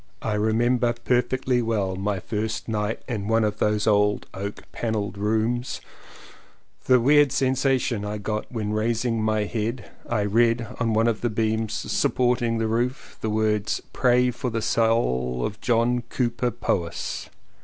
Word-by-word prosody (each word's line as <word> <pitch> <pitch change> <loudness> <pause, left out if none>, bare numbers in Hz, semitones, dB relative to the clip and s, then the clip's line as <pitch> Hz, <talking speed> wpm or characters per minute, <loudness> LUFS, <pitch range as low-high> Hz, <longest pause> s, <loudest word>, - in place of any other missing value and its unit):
I 110 - -1
remember 120 +3 +2
perfectly 125 0 +1
well 105 -5 -1
my 100 +1 -1
first 110 +3 -3
night 105 -1 -2
in 105 -5 -3
one 115 0 +3
of 105 0 -1
those 105 0 +1
old 105 -1 +2
oak 100 +1 -6
panelled 105 -4 -2
rooms 110 +4 -1 0.5
— - - -28
the 130 -1 +5
weird 145 +2 +5
sensation 130 -4 +1
I 105 +1 -3
got 105 +1 -4
when 105 -3 -2
raising 115 +1 0
my 110 -1 +1
head 110 +2 -3 0.2
I 115 -3 +1
read 115 +2 +2
on 115 -2 +1
one 110 +1 +3
of 115 -2 0
the 120 - +1
beams 110 0 -1
supporting 120 0 +1
the 115 - 0
roof 120 +4 -2
the 110 - -1
words 105 -1 0
"Pray 125 0 +3
for 125 +1 -3
the 115 -1 -2
Soul 65 - +1
of 105 0 -5
John 120 +1 +2
Cowper 120 0 0
Powys." 90 -7 -3
110 Hz, 155 wpm, -24 LUFS, 105-120 Hz, 0.5 s, the